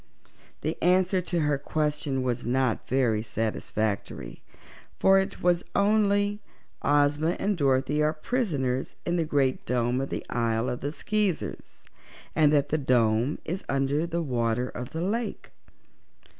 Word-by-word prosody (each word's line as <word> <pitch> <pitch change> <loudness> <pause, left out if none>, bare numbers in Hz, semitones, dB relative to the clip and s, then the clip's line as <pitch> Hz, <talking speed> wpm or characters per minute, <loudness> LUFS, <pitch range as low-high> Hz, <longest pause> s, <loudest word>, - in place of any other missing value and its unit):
The 155 +2 -3
answer 185 +1 +3
to 175 -1 -1
her 150 -2 +1
question 150 -2 -1
was 125 -1 -1
not 125 -1 0
very 120 -5 +2
satisfactory, 110 - -3 0.6
for 195 0 +5
it 190 - -4
was 175 0 +3
only: 205 0 +2 0.4
"Ozma 145 +3 +2
and 205 +1 +1
Dorothy 140 0 +1
are 150 0 +3
prisoners 155 - -2
in 175 0 0
the 165 - +1
great 140 -3 +1
Dome 125 +1 0
of 135 - -3
the - - -4
Isle 115 0 0
of 125 - -4
the 145 - -3
Skeezers, 210 +1 -2 0.5
and 150 -2 +5
the 145 +1 +2
Dome 120 0 +2
is 180 +4 -3
under 140 +4 +1
the 170 0 -2
water 125 -2 0
of 125 0 -6
the 160 - -4
lake." 220 +5 -3
145 Hz, 140 wpm, -27 LUFS, 125-175 Hz, 0.6 s, for